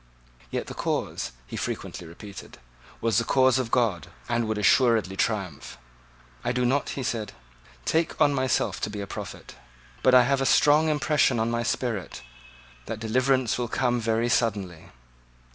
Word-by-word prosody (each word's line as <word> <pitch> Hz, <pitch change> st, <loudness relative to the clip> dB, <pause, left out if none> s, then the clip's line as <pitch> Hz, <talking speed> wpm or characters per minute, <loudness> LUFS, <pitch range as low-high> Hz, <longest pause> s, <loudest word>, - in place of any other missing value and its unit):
Yet -, -, -3 dB
the -, -, -8 dB
cause, 65 Hz, -, -2 dB
he -, -, -8 dB
frequently 85 Hz, -, -5 dB
repeated, 100 Hz, +4 st, -11 dB, 0.4 s
was 115 Hz, -2 st, +2 dB
the -, -, 0 dB
cause 130 Hz, +2 st, +3 dB
of 125 Hz, -3 st, -2 dB
God, 110 Hz, -, +1 dB, 0.2 s
and 120 Hz, -1 st, 0 dB
would 110 Hz, -1 st, -1 dB
assuredly 105 Hz, -2 st, +3 dB
triumph. 95 Hz, -7 st, -2 dB, 0.7 s
"I -, -, 0 dB
do 125 Hz, 0 st, 0 dB
not," 135 Hz, +3 st, +1 dB
he 135 Hz, -, -2 dB
said, 115 Hz, -4 st, -3 dB, 0.5 s
"take 165 Hz, 0 st, 0 dB
on 145 Hz, -, +4 dB
myself 130 Hz, -2 st, 0 dB
to -, -, -1 dB
be 105 Hz, 0 st, -6 dB
a -, -, -4 dB
prophet. -, -, -8 dB, 0.5 s
But 130 Hz, -1 st, +5 dB
I 125 Hz, -, +8 dB
have 135 Hz, +2 st, +1 dB
a -, -, +1 dB
strong 150 Hz, +2 st, +5 dB
impression 150 Hz, -4 st, +2 dB
on 115 Hz, +1 st, 0 dB
my 115 Hz, 0 st, 0 dB
spirit, 115 Hz, -, -3 dB, 0.6 s
that 110 Hz, -, -4 dB
deliverance 125 Hz, +2 st, +1 dB
will 120 Hz, -, -1 dB
come 120 Hz, 0 st, 0 dB
very 115 Hz, +1 st, +1 dB
suddenly." 100 Hz, -8 st, -1 dB
115 Hz, 160 wpm, -26 LUFS, 105-130 Hz, 0.7 s, I